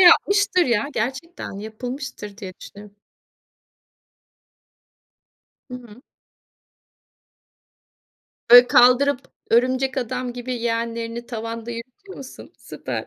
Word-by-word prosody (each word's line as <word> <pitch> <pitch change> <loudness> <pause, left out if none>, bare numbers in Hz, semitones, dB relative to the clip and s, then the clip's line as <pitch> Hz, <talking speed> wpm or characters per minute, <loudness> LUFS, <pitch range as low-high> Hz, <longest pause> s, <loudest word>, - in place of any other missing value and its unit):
yapmıştır 375 +1 +5
ya, 235 +2 +1
gerçekten 265 +10 -4
yapılmıştır 220 0 -7
diye 195 -4 -8
düşünüyorum. 205 0 -13 2.7
Hı 250 - -6
hı. 240 -1 -12 2.5
Böyle 245 +1 +10
kaldırıp 250 +3 +4 0.3
örümcek 255 +3 +2
adam 250 0 -3
gibi 245 +1 -6
yeğenlerini 230 0 -3
tavanda 230 0 -6
yürütüyor 255 - -10
musun? 265 -1 -11
Süper. - - -6
245 Hz, 85 wpm, -22 LUFS, 230-260 Hz, 2.7 s, Böyle